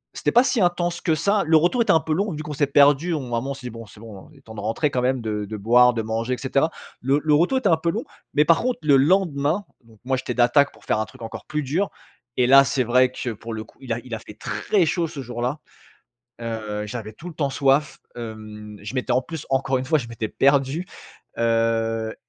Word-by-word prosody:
c'était - - 0
pas 245 - +6
si 255 -4 +1
intense 175 -1 0
que 160 -3 +1
ça, 200 +6 +1
le 160 0 +6
retour 175 +10 +2
était 230 - +3
un 160 - +5
peu 160 0 -2
long 200 +5 0
vu 155 - -5
qu'on 150 - -6
s'est 145 0 +1
perdus, 145 +4 +4
on 150 - -2
à - - +2
un - - -1
moment, 135 +2 -4
on - - -1
s'est 130 - -12
dit: - - -4
«Bon, 115 0 -9
c'est 105 - -16
bon, 105 -4 -11
il 150 - -19
est - - -23
temps 110 -4 -12
de - - -7
rentrer 115 +8 0
quand 125 - 0
même, 130 0 0
de 105 -2 -3
de 110 +2 -6
boire, 125 +4 +5
de 115 - -1
manger 115 +3 -2
et - - -12
cetera». 140 +4 +1 0.3
Le 135 +4 +2
le 150 -1 +3
retour 175 - +3
était 205 -7 +1
un 165 - +4
peu 170 +1 -1
long, - - -3 0.3
mais 150 - +4
par 165 0 +4
contre 250 0 -1
le 145 -2 +5
lendemain, 160 +2 +2 0.2
donc 110 -2 -20
moi 130 0 0
j'étais 125 -1 -4
d'attaque 125 +4 +4
pour - - -20
faire - - +1
un 110 - -1
truc 130 +1 -17
encore 115 - -8
plus 150 0 -3
dur 165 +9 -1 0.5
et 125 - +4
là 135 +2 +8
c'est 135 -1 0
vrai 125 +2 +3
que, 125 -1 -4
pour 115 +1 -8
le 110 0 -5
coup, - - -22
il 130 - -7
a - - -2
il 125 - -9
a 110 - -3
fait 105 - -13
très 195 -5 0
chaud 170 +1 0
ce 145 -3 -7
jour-là, 125 +3 -3 0.8
heu, 110 -2 -4
j'avais 110 -1 -6
tout 170 - -10
le 170 - -9
temps 140 -2 -1
soif, 140 +2 +1 0.2
hem, 110 -2 -8
je 105 +5 -7
m'étais 130 -1 -1
en 125 +1 +2
plus 160 +1 -8
encore 135 0 +1
une 130 - -4
fois, 155 +1 +3
je 120 -4 -6
m'étais 115 -2 -4
perdu, 140 +7 +1 0.5
heu, 115 -1 0
130 Hz, 265 wpm, -23 LUFS, 115-155 Hz, 0.8 s, là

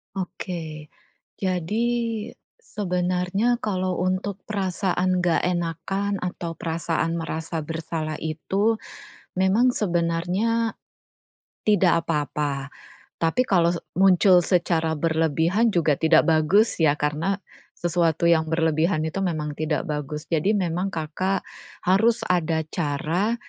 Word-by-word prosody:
Oke. 165 -5 -5 0.5
Jadi 190 +5 -1 0.7
sebenarnya 185 - -1
kalau 185 -4 -1
untuk 185 +2 -1
perasaan 185 -2 0
enggak 175 -2 +1
enakan 180 +3 -1
atau 175 -2 -4
perasaan 165 0 -1
merasa 160 0 -4
bersalah 160 -1 -4
itu, 195 +8 0 0.6
memang 195 +7 +4
sebenarnya 185 +3 0 0.9
tidak 175 -5 +3
apa-apa, 145 -2 -2 0.5
tapi 165 +10 +2
kalau 175 -6 +3
se - - -5 0.2
muncul 190 -1 +6
secara 165 -2 +1
berlebihan 165 +7 +2
juga 165 -7 +2
tidak 160 0 +5
bagus 165 +8 +3
ya 150 -2 +4
karena 150 +7 0 0.4
sesuatu 170 -2 +1
yang 165 -2 +4
berlebihan 160 +1 +1
itu 160 +5 -3
memang 155 -5 -2
tidak 155 -1 0
bagus. 150 -1 -4
Jadi, 165 +5 +2
memang 180 0 -1
Kakak 170 +4 -2 0.4
harus 215 +6 +3
ada 165 -3 +1
cara 170 +7 0
170 Hz, 105 wpm, -24 LUFS, 160-190 Hz, 0.9 s, muncul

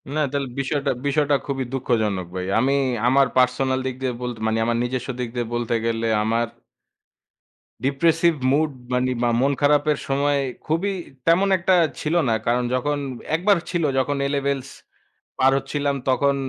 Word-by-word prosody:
না - - 0
তাহলে 140 -1 -2
বিষয়টা 140 0 0 0.2
বিষয়টা 145 0 +2
খুবই 135 -2 -2
দুঃখজনক 110 -8 0
ভাই। 90 0 -3
আমি 135 +3 +2 0.3
আমার 135 +1 +4
পার্সোনাল 130 +1 +2
দিক 130 -1 -2
দিয়ে 130 -2 -1
বলতে 120 -2 -4
মানে 110 0 +1
আমার 120 0 +1
নিজস্ব 125 +1 -3
দিক 125 -2 -2
দিয়ে 120 -1 -1
বলতে 120 -1 -1
গেলে, 115 0 0 0.2
আমার 115 +2 +1 1.4
ডিপ্রেসিভ 165 +4 +3 0.2
মুড 155 +2 +2 0.2
মানে 125 +1 +1
বা 120 - +3
মন 140 +1 +2
খারাপের 145 +1 +3
সময় 140 +1 +1 0.3
খুবই 175 +6 0 0.3
তেমন 180 +4 +4
একটা 185 +1 +2 0.3
ছিল 155 +3 -1
না। - - +3
কারণ 125 +1 +2
যখন, 145 +3 0 0.4
একবার 195 +3 +3
ছিল, 175 -2 -1
যখন 140 +2 +1
এ - - +1
লেভেলস 140 -1 -1 0.7
পার 130 +1 +5
হচ্ছিলাম। 140 0 -1
তখন 140 +2 +2
135 Hz, 155 wpm, -22 LUFS, 125-145 Hz, 1.4 s, পার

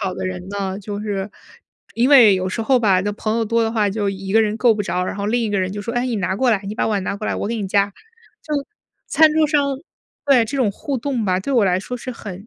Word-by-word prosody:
好 190 -1 -2
的 - - -4
人 185 0 -6
呢， 195 0 -4
就 205 +1 -6
是 205 -1 -3 0.6
因 240 +3 +2
为 245 -8 +7
有 185 0 -1
时 225 - -3
候 250 +2 +2
吧， 195 -4 +3
那 205 +1 -2
朋 215 +2 -2
友 230 - 0
多 230 +1 +1
的 225 - 0
话 215 -3 +1
就 200 0 -1
一 195 0 -6
个 225 +1 +5
人 215 0 -1
够 235 -2 +4
不 210 - -2
着， 180 -2 -2
然 - - -4
后 200 0 -3
另 240 +3 +1
一 220 - -1
个 200 -2 0
人 185 - -1
就 205 +1 -5
说： 230 +3 -5
“哎， 245 +1 0
你 235 -3 -2
拿 190 -1 -1
过 250 +5 +2
来， 210 -4 +2
你 210 - -4
把 - - 0
碗 200 -3 -1
拿 - - -2
过 215 - -7
来， - - -1
我 - - -3
给 230 - -2
你 205 -4 -3
夹。” 200 0 +2 0.5
就 300 - -4 0.5
餐 315 -1 +5
桌 315 0 +3
上 295 -1 +2 0.6
对， 270 -5 +4
这 275 - -4
种 245 -6 +2
互 270 +7 -4
动 250 -2 -2
吧， 185 -1 +1
对 275 - -3
我 235 -5 +4
来 180 -1 +2
说 250 - -6
是 255 +1 -7
很 200 -3 -9
210 Hz, 310 characters per minute, -20 LUFS, 195-235 Hz, 0.6 s, 为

